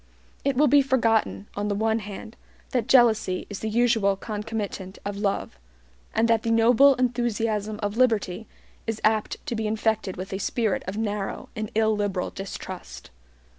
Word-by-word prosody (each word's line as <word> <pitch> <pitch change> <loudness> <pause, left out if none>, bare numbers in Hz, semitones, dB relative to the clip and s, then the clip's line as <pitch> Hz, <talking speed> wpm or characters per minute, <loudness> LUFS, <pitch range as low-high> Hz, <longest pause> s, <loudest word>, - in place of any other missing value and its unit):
It 275 -1 +1
will 295 +4 +4
be 285 +2 +6
forgotten, 230 -6 +1
on 205 +1 -2
the 205 - 0
one 220 +2 +1
hand, 210 +2 -8 0.4
that 250 -3 0
jealousy 220 -7 +4
is 205 - -5
the 220 - -3
usual 225 -3 +3
concomitant 210 -2 -5
of 205 0 -3
love, 200 - -2 0.6
and 225 +1 +3
that 230 -1 +3
the 230 - -2
noble 240 +5 +6
enthusiasm 225 -4 -1
of 205 +2 -2
liberty 225 -5 +1 0.4
is 225 -1 -2
apt 215 -1 +1
to 280 - -3
be 220 -1 -1
infected 220 -3 -1
with 190 +2 -6
a 190 - -2
spirit 220 0 0
of 190 +2 -4
narrow 210 -2 -3
and 215 -1 -3
illiberal 210 -4 +1
distrust. 190 - -8
220 Hz, 160 wpm, -25 LUFS, 205-230 Hz, 0.6 s, be